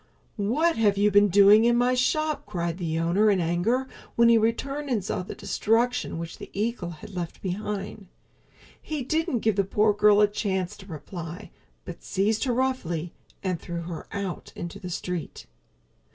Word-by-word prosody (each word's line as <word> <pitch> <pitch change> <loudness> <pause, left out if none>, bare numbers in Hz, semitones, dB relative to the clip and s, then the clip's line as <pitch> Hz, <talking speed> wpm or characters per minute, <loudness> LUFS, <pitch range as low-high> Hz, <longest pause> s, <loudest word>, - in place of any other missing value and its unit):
"What 285 +12 +1
have 205 -3 +3
you 205 +1 +3
been 205 +1 +6
doing 200 +3 +7
in 235 0 +4
my 245 +1 +3
shop?" 305 +4 0
cried 170 -3 -3
the 165 -2 -2
owner 175 +6 +3
in 195 -2 +3
anger 180 +10 0 0.3
when 235 0 +5
he 230 - +6
returned 275 +6 -1
and 220 -7 0
saw - - -2
the 180 - -7
destruction 240 -1 0
which 165 0 -7
the - - -9
eagle 210 -3 -2
had 170 +4 -10
left 175 -3 -5
behind. 200 +1 -4 0.7
He 305 -3 -4
didn't 290 -4 0
give 220 -3 +1
the 200 - +4
poor 210 +2 +2
girl 210 0 +5
a 210 - +6
chance 190 -3 -2
to 190 - -13
reply, 170 +3 -8 0.3
but 175 - -8
seized 210 +5 0
her 250 - +1
roughly 180 -11 -1 0.3
and 185 -3 -1
threw 170 -1 -5
her 170 -1 -7
out 195 -3 -5
into 170 0 -6
the 180 - -7
street. 180 -1 -5
205 Hz, 175 wpm, -26 LUFS, 175-235 Hz, 0.7 s, doing